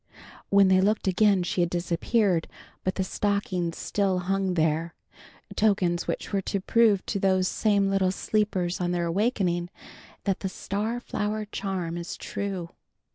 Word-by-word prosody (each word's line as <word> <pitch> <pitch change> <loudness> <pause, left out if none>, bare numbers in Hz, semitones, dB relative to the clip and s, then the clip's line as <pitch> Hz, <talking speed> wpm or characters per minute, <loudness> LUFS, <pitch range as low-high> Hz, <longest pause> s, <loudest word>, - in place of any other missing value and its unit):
When 200 -1 +6
they 185 0 +5
looked 210 +1 +1
again 195 0 +3
she 175 +1 -1
had 175 - +2
disappeared, 175 +2 +1 0.4
but 185 - -1
the 190 - 0
stockings 185 -3 -1
still 195 -2 0
hung 190 0 0
there, 160 +1 0 0.6
tokens 185 -5 +1
which - - -4
were 195 - +2
to 200 - -2
prove 215 0 +3
to 200 - -2
those 185 -1 +2
same 205 -1 +2
little 195 -1 +2
sleepers 190 -3 -1
on 175 0 0
their 175 -1 0
awakening 175 -2 0 0.5
that 195 -2 0
the 190 - -3
star 210 +5 -3
flower 215 -2 -3
charm 185 -5 -3
is 170 - -6
true. 190 -4 -4
190 Hz, 150 wpm, -26 LUFS, 175-205 Hz, 0.6 s, When